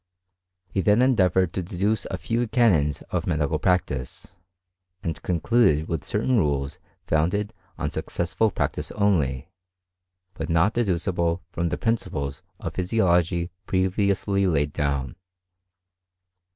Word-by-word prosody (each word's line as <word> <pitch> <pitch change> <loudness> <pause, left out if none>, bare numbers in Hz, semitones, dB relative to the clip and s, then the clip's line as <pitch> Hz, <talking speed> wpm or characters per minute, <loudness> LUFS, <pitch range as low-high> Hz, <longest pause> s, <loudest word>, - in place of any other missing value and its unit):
He 95 - -1
then 105 +7 +4
endeavoured 95 -8 +3
to 95 - -1
deduce 95 +4 -1
a 95 - -3
few 115 +5 -1
canons 90 - +2
of - - -1
medical 75 0 0
practice, 90 +1 -1 0.7
and 80 - -3
concluded 85 -3 +2
with 80 -3 -2
certain 115 +4 +1
rules 70 -7 0 0.3
founded 90 +7 0 0.2
on - - -2
successful 85 +6 0
practice - - -2
only, 85 -8 +1 0.8
but 80 -2 -5
not 85 +6 +3
dedu 110 -7 +1
cible 85 -1 -1
from 85 0 -1
the - - -2
principles 70 - -2 0.2
of - - -5
physiology 90 -3 +1 0.2
previously 100 +1 +1
laid 75 -4 +1
down. 70 0 -2
90 Hz, 120 wpm, -25 LUFS, 80-100 Hz, 0.8 s, then